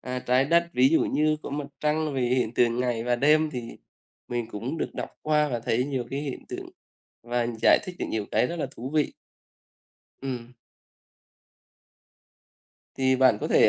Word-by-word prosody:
a, 125 0 -4
Trái 125 +1 +2
Đất, 170 +3 +3
ví 130 -2 +5
dụ 160 - +3
như 155 0 +2
có - - -6
Mặt 145 0 -3
Trăng 150 -1 0
về 130 - 0
hiện 120 -2 +1
tượng 120 0 +2
ngày 120 -2 -1
và 120 0 +1
đêm, 155 +4 +4
thì 120 -4 -5 0.6
mình 120 -1 -2
cũng 120 +10 -4
được - - -3
đọc - - -4
qua 150 -1 +2
và 120 - -1
thấy 115 +2 +1
nhiều 130 -4 -2
cái 140 - -2
hiện 145 -3 -6
tượng - - -6 0.5
và 120 0 -1 0.2
giải - - +7
thích 180 - -7
được - - -2
nhiều 110 -2 -2
cái - - +3
rất 170 - -4
là 155 - -2
thú 125 +3 -6
vị. 150 -2 +2 1.1
Ừm. 125 -3 -5 2.4
Thì 130 0 +2
bạn 130 -5 +5
có - - -2
thể, - - +6
130 Hz, 185 wpm, -26 LUFS, 120-150 Hz, 2.4 s, giải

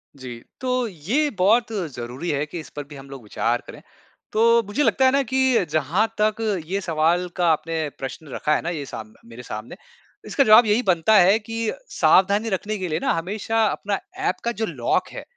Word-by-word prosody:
जी। 125 -3 -8 0.2
तो 255 -2 0
ये 215 - -1
बहुत 225 +5 +3 0.2
ज़रूरी 125 +8 -5
है 145 0 -1
कि 165 +3 -7
इस 155 - -10
पर 145 - -4
भी 150 - -11
हम 135 0 -12
लोग 135 -4 -10
विचार 115 +3 -1
करें। - - -11 0.5
तो 230 +1 +4
मुझे 245 +9 0
लगता 265 - +3
है 260 - +5
ना 275 - +3
कि 260 -4 +2
जहाँ 160 +8 +1
तक 215 +1 +1 0.2
ये 190 +5 -2
सवाल 170 +1 +1
का 175 -2 +1
आपने 160 0 -1
प्रश्न 135 +3 -7
रखा 150 - +1
है - - -1
ना 170 - -3
ये 150 -5 -4
साम 110 -4 -9
मेरे 115 +1 -11
सामने। 110 +6 -7 0.5
इसका 275 - +2
जवाब 220 0 +7
यही 215 +3 +2
बनता 180 +4 +3
है 195 +3 +6
कि 225 0 -3 0.2
सावधानी 200 +4 +3
रखने 210 +2 -2
के 185 -2 -3
लिए 155 +1 -1
ना - - 0
हमेशा 210 +6 -1
अपना 200 -1 -2 0.3
ऐप - - -1
का 235 - 0
जो - - +2
लॉक - - -1
है - - -7
185 Hz, 205 wpm, -23 LUFS, 150-225 Hz, 0.5 s, जवाब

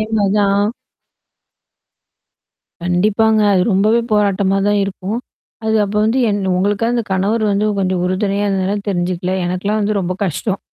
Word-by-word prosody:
இதேமாரிதான் 205 -1 +1 2.1
கண்டிப்பாங்க. 215 +5 +2
அது 185 -2 +3
ரொம்பவே 215 +5 +3
போராட்டமா 200 -2 +2
தான் 205 0 +2
இருக்கும். 195 +3 -4 0.5
அது 220 0 +1
அப்ப 205 +1 -4
வந்து 230 +4 +1
என் 205 -1 0 0.2
உங்களுக்காவதுந்த 225 +5 0
கணவர் 205 +4 0
வந்து 205 +1 +1
கொஞ்சம் 185 -1 0
உறுதுணையா 200 +2 0
இருந்தனால 195 +1 0
தெரிஞ்சுக்கல. 180 0 -1
எனக்கலாம் 200 +4 -1
வந்து 205 0 0
ரொம்ப 185 0 -2
கஷ்டம். 195 +3 -2
200 Hz, 125 wpm, -17 LUFS, 190-215 Hz, 2.1 s, அது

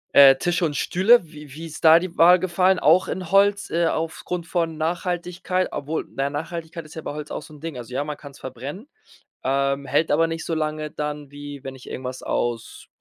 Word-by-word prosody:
Äh, 135 -1 +9
Tische 175 +2 0
und 150 -3 0
Stühle. 190 0 +4
Wie 150 -3 -12
wie 165 +2 -8
ist 160 0 -9
da 160 +1 +8
die 180 -1 -6
Wahl 175 +2 +7
gefallen, 185 +1 +2
auch 170 +4 +4
in 185 -2 -4
Holz, 200 0 +3
äh, 170 0 +1
aufgrund 165 +2 -3
von 165 -3 -1
Nachhaltigkeit? 175 +2 -1
Obwohl, 155 +3 -3
naja, 135 +1 0
Nachhaltigkeit 160 +2 -6
ist 155 - -13
ja 160 - -5
bei - - -5
Holz 150 0 -7
auch - - -4
so 155 - -14
'n 150 - -13
Ding. 160 -3 -6
Also 125 0 -8
ja, 135 - 0
man 150 -1 -4
kann's 140 -2 -13
verbrennen, 135 - -7 0.6
ähm, 140 +1 0
hält 145 +5 +1
aber 165 +2 +4
nicht 165 0 -4
so 165 - -2
lange 155 -1 -2
dann, 150 -1 -5
wie 145 -1 -9
wenn 135 0 -6
ich 130 - -12
irgendwas 130 0 -6
aus, 120 -2 -3
160 Hz, 210 wpm, -23 LUFS, 145-175 Hz, 0.6 s, Äh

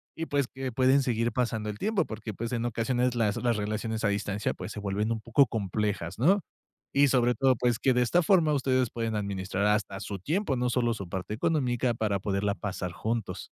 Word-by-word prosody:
y 165 - -3
pues, 140 -4 0
que 130 0 -5
pueden 130 +2 +4
seguir 120 -2 0
pasando 115 -3 -1
el 105 - -5
tiempo, 205 - +1
porque, 110 0 -6
pues, 115 +4 -4
en 120 -1 -1
ocasiones 120 +2 0
las 105 -3 +1
las 120 -1 +1
relaciones 110 +2 -2
a 105 - +3
distancia, 100 0 -1
pues, 110 - -7
se 105 - -6
vuelven 105 +2 -1
un 110 - -5
poco 120 +5 +4
complejas, 100 -4 -2
¿no?, 190 - +4 0.5
y 140 0 +5
sobre 125 -1 +3
todo, 130 +2 +3
pues, 120 0 +1
que 130 - +3
de 125 - +2
esta 170 +8 +3
forma 160 -5 +4
ustedes 130 -3 +1
pueden 115 -2 -3
administrar 100 -1 -2
hasta 105 -2 0
su 100 -1 -5
tiempo, 155 - 0
no 125 0 0
solo 120 -1 +1
su 100 -5 -6
parte 95 +3 -4
económica, 125 -3 +1
para 105 -3 -1
poderla 100 +1 -1
pasar 95 -2 -4
juntos. 115 +1 -3
115 Hz, 210 wpm, -28 LUFS, 105-130 Hz, 0.5 s, y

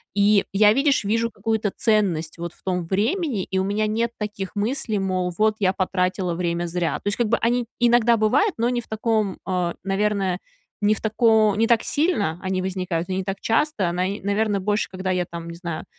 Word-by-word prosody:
И 205 0 +4
я, 210 +1 +6
видишь, 275 +1 +2
вижу 230 +3 0
какую-то 220 -3 -1
ценность 185 -8 +1
вот 170 0 -5
в - - -28
том 180 -2 -1
времени, 220 - 0
и 190 - -3
у 190 - +2
меня 205 +2 0
нет 230 +2 0
таких 205 -2 -5
мыслей, 220 0 -1
мол: 185 -2 -1
"Вот, 215 0 +3
я 190 -2 +2
потратила 185 -1 -1
время 170 0 -1
зря". 170 0 -1
То - - -8
есть, 205 - 0
как 235 -3 +1
бы, 235 - +3
они 240 +1 +1
иногда 240 -1 +4
бывают, 230 - +2
но 235 +1 +2
не 245 -1 0
в - - -19
таком, 220 -3 -1
а, 180 -2 -1
наверное, 195 -1 0 0.4
не 205 +1 +4
в 215 - -6
тако 220 -1 +3
не 225 - +3
так 230 -1 +3
сильно 215 - 0
они 185 0 -1
возникают 185 -2 -3
и 185 - -1
не 190 - -1
так 195 +1 -5
часто. 225 - +1
Наи 185 +3 -2
наверное, 205 +1 0
больше, 205 +3 0
когда 185 0 -4
я 180 -1 0
там, 170 0 -8
не 170 - -7
знаю, 170 -2 -5
205 Hz, 205 wpm, -23 LUFS, 185-220 Hz, 0.4 s, я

